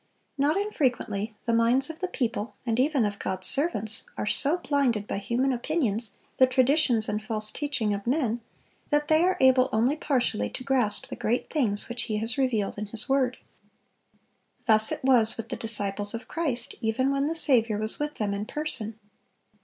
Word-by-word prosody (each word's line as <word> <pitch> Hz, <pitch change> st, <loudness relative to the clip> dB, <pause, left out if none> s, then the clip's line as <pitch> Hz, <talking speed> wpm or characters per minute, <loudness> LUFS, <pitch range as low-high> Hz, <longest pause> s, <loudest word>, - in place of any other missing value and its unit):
Not 290 Hz, +5 st, +1 dB
infrequently 245 Hz, -, -2 dB
the 235 Hz, -, 0 dB
minds 235 Hz, +4 st, +2 dB
of 320 Hz, -, -15 dB
the 370 Hz, -, -2 dB
people, 235 Hz, -, -3 dB
and 230 Hz, 0 st, -1 dB
even 275 Hz, -3 st, +2 dB
of 205 Hz, -1 st, -4 dB
God's 185 Hz, 0 st, -4 dB
servants, 225 Hz, -8 st, +1 dB
are -, -, -2 dB
so 285 Hz, +10 st, +2 dB
blinded 275 Hz, -, 0 dB
by -, -, -3 dB
human 250 Hz, +6 st, 0 dB
opinions, 235 Hz, -6 st, 0 dB, 0.2 s
the 260 Hz, -, +6 dB
traditions 255 Hz, -3 st, +3 dB
and 210 Hz, +1 st, -2 dB
false 215 Hz, 0 st, +4 dB
teaching 270 Hz, -8 st, -1 dB
of 200 Hz, +2 st, -6 dB
men, 245 Hz, -4 st, 0 dB, 0.5 s
that 295 Hz, 0 st, 0 dB
they 315 Hz, 0 st, +4 dB
are 370 Hz, +2 st, +2 dB
able 260 Hz, 0 st, +4 dB
only 235 Hz, +6 st, +1 dB
partially 250 Hz, -, -1 dB
to 255 Hz, -, -8 dB
grasp 250 Hz, -6 st, 0 dB
the -, -, -5 dB
great 240 Hz, +4 st, -2 dB
things 220 Hz, -10 st, 0 dB
which 240 Hz, -1 st, -4 dB
He 215 Hz, -, -2 dB
has 225 Hz, +1 st, -1 dB
revealed 225 Hz, -7 st, -1 dB
in 210 Hz, -, -5 dB
His 225 Hz, +3 st, -2 dB
word. 265 Hz, -2 st, +1 dB, 1.3 s
Thus 220 Hz, -2 st, +5 dB
it -, -, -4 dB
was 240 Hz, -4 st, +4 dB
with 230 Hz, -, -7 dB
the -, -, -3 dB
disciples 205 Hz, -2 st, +1 dB
of 230 Hz, -, -7 dB
Christ, 275 Hz, -8 st, -2 dB
even 250 Hz, +4 st, 0 dB
when 275 Hz, +1 st, 0 dB
the 325 Hz, -, -2 dB
Saviour 235 Hz, -9 st, +3 dB
was 215 Hz, +1 st, -2 dB
with 295 Hz, 0 st, -3 dB
them 205 Hz, -2 st, -2 dB
in 205 Hz, +1 st, -4 dB
person. 240 Hz, -8 st, -2 dB
240 Hz, 185 wpm, -26 LUFS, 215-275 Hz, 1.3 s, the